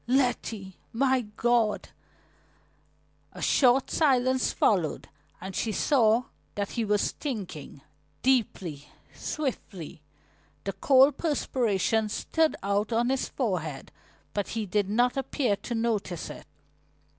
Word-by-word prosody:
"Letty! 235 -7 0
My 260 -1 +2
God!" 235 -3 +1 1.4
A - - -9
short 260 0 +4
silence 260 -4 +2
followed 175 -8 +1 0.3
and 190 0 -7
she 225 - -1
saw 230 0 +3 0.3
that 200 -1 -2
he 235 - -1
was 210 -1 +1
thinking, 190 - -6 0.4
deeply, 185 - 0 0.2
swiftly. 210 - -5 0.6
The 195 - -3
cold 270 +1 +5
perspiration 225 - +1
stood 320 +8 +1
out 200 +3 0
on 235 +2 +2
his 265 0 0
forehead 175 - -3 0.4
but 205 -1 -1
he 220 - -1
did 200 +1 0
not 245 +5 +2
appear 265 -5 0
to 235 +4 -5
notice 215 -7 -2
it. - - -11
225 Hz, 110 wpm, -28 LUFS, 200-255 Hz, 1.4 s, cold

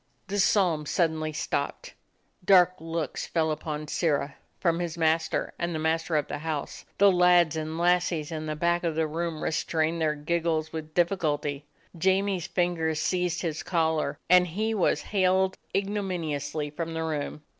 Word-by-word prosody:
The 205 +1 -1
psalm 180 -7 +2
suddenly 160 -2 0
stopped. 150 - -3 0.5
Dark 180 -1 +6
looks 165 0 -4
fell 160 -2 +1
upon 150 0 -4
Sirrah 145 -3 0 0.3
from 170 -2 +1
his 170 -1 -3
master 160 0 +1
and 170 -1 -2
the - - 0
mas 160 +1 +1
ter 165 - -2
of 150 -2 +1
the 145 - -4
house. 155 -2 -4
The 200 0 +6
lads 180 -3 +4
and 160 0 -3
lassies 175 -2 +1
in 155 -1 -4
the 155 - -2
back 170 +2 +1
of 165 -2 -1
the 160 0 +1
room 160 0 -3
restrained 160 +1 0
their 155 -1 +1
giggles 160 0 -1
with 155 -1 -6
difficulty. 150 -5 0 0.3
Jamie's 190 +1 +1
fingers 165 -3 0
seized 180 +1 0
his 160 -2 -2
collar, 160 -4 0
and 180 0 +6
he 215 +6 -1
was 200 -5 +1
haled 190 -1 +2 0.2
ignominiously 160 -8 -2
from 165 +2 -4
the 160 - -2
room. 150 -1 -3
165 Hz, 160 wpm, -27 LUFS, 155-180 Hz, 0.5 s, Dark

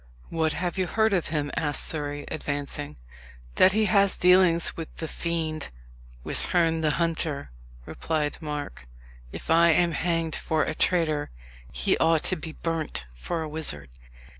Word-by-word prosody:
"What 160 -1 0
have 180 +2 -2
you 185 - +1
heard 220 +1 +2
of 180 -4 +1
him?" 150 -2 -2
asked 145 -2 +2
Surrey, 145 -2 -4
advancing. 145 0 -4 0.6
"That 185 - +6
he 215 +1 +3
has 200 0 +4
dealings 180 -2 +4
with 165 -1 -5
the 160 - -4
fiend 160 -2 -3 0.6
with - - -2
Herne 165 -2 +1
the 155 - +2
Hunter," 160 - -1 0.3
replied 150 -3 -2
Mark. 150 - -6 0.4
"If - - -6
I 170 +1 +6
am 170 +1 +3
hanged 165 0 -1
for 155 -1 0
a - - -2
traitor, 155 - +1 0.4
he - - +1
ought 160 -1 +3
to 185 - +1
be 160 -1 -7
burnt 160 - -3
for 160 - -4
a - - -4
wizard." 110 - -1
160 Hz, 155 wpm, -26 LUFS, 150-170 Hz, 0.6 s, That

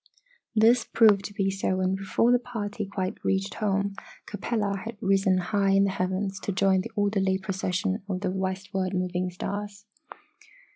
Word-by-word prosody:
This 225 +2 +5
proved 210 -4 +4
to 205 - -6
be 195 -1 +1
so 190 -1 -1
and 185 0 +1
before 195 +5 +1
the 245 - +5
party 215 -4 -5
quite 190 -1 -4
reached 195 +1 0
home 200 -1 0 0.3
Capella 205 -2 -2
had 230 -1 -7
risen 195 -1 +2
high 195 +1 +1
in 195 0 +5
the 200 - +1
heavens 190 +1 -2
to - - -3
join 190 0 +3
the 230 - -7
orderly 200 -2 +1
procession 190 +1 -2
of 190 0 -2
westward 190 0 -2
moving 180 0 -1
stars. 200 +3 -5
195 Hz, 155 wpm, -27 LUFS, 190-205 Hz, 0.3 s, This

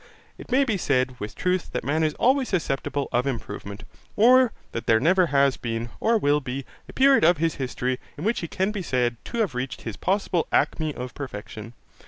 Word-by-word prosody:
It - - -11
may 265 +3 +4
be 225 -7 0
said 130 -6 0
with 105 - -6
truth 180 0 -1
that - - -2
man 155 +3 0
is 155 -1 0
always 260 +1 +2
susceptible 145 -5 -1
of 125 +3 +1
improvement, 105 -4 -5 0.3
or 250 +2 +6 0.2
that 115 - -5
there 110 -1 +5
never 180 +6 +3
has 140 -2 +3
been, 115 0 -4
or 230 +1 +3
will 145 -7 +2
be, 135 -1 -5 0.2
a - - -10
period 270 -4 +5
of 170 +2 +5
his 165 0 0
history, 125 0 -2 0.2
in 150 - -6
which 220 +4 +1
he 170 - -4
can 190 +5 -1
be 210 -2 -4
said 125 -7 0
to 235 - -5
have 195 -11 0
reached 125 +1 -4
his 115 -3 -6
possible 190 -3 0
acme 155 -1 +1
of 125 0 -6
perfection. 115 -3 -8
145 Hz, 205 wpm, -25 LUFS, 125-190 Hz, 0.3 s, or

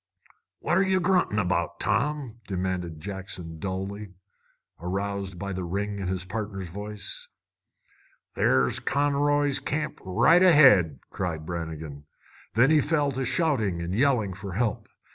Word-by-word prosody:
"What're 180 +2 +2
ye 190 -1 +2
gruntin' 180 - +2
about, 90 -4 0
Tom?" 140 -6 -1
demanded 90 -4 -3
Jackson 90 -3 -7
dully, 95 +2 -5 0.6
aroused 95 +1 -3
by 100 +2 -4
the 95 0 -3
ring 100 +3 -3
in 95 - -3
his 95 0 -2
partner's 100 -3 -5
voice. 105 +2 -6 1.0
"There's 65 -1 +2
Conroy's 145 0 +1
Camp 150 +2 -3
right 120 - +4
ahead!" 130 - +6
cried 85 -4 -3
Brannigan. 80 -4 -6 0.5
Then 125 +6 +5
he 155 -1 +5
fell 145 -1 +1
to 135 0 -2
shouting 115 - +1
and 85 +1 -3
yelling 115 -4 +2
for 100 0 -7
help. 110 +2 -1
100 Hz, 125 wpm, -26 LUFS, 90-140 Hz, 1.0 s, ahead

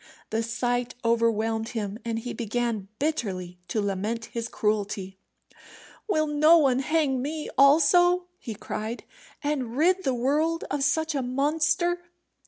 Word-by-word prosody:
The 220 +1 +1
sight 245 +1 -1
overwhelmed 225 -1 +1
him, 205 0 -3
and 230 -1 -2
he 240 +2 -5
began 230 -3 -2
bitterly 190 - -2
to 195 +5 -1
lament 205 +3 -2
his 230 -1 -3
cruelty. 205 -4 -2 0.9
"Will 310 -7 +2
no 305 +2 +5
one 270 -5 +3
hang 280 -2 +1
me 300 +3 -4
also," 350 +6 +5
he 225 - -6
cried, 220 +3 -5 0.4
"and 265 -5 -2
rid 365 +5 +3
the 265 -3 +1
world 300 +7 +1
of 285 -1 0
such 315 +2 +1
a 275 - 0
monster?" 310 +7 +1
250 Hz, 135 wpm, -26 LUFS, 225-305 Hz, 0.9 s, no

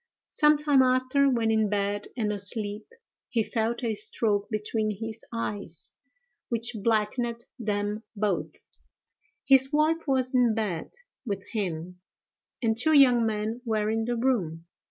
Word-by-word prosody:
Some 300 -1 +4
time 290 -2 +4
after, 255 +2 +3
when 230 -3 +1
in 220 -1 +2
bed 205 0 -1
and 215 -3 0
asleep, 205 +1 -5 0.4
he 230 -2 +1
felt 230 +3 -2
a 230 -2 0
stroke 205 -1 0
between 215 -1 -2
his 225 0 -5
eyes, 205 -7 -5 0.6
which 235 0 0
blackened 230 +2 0
them 210 -1 -2
both: 210 0 0 1.0
his 270 0 +5
wife 315 +2 +1
was 260 -1 +1
in 245 -3 +3
bed 205 -7 -2 0.3
with 200 -5 -4
him, 180 -3 -4 0.6
and 225 -1 +2
two 280 +8 +2
young 250 -5 +6
men 220 +2 -2
were 215 -3 0
in 225 0 0
the 240 +1 -1
room. 195 -10 -1
225 Hz, 135 wpm, -27 LUFS, 210-250 Hz, 1.0 s, young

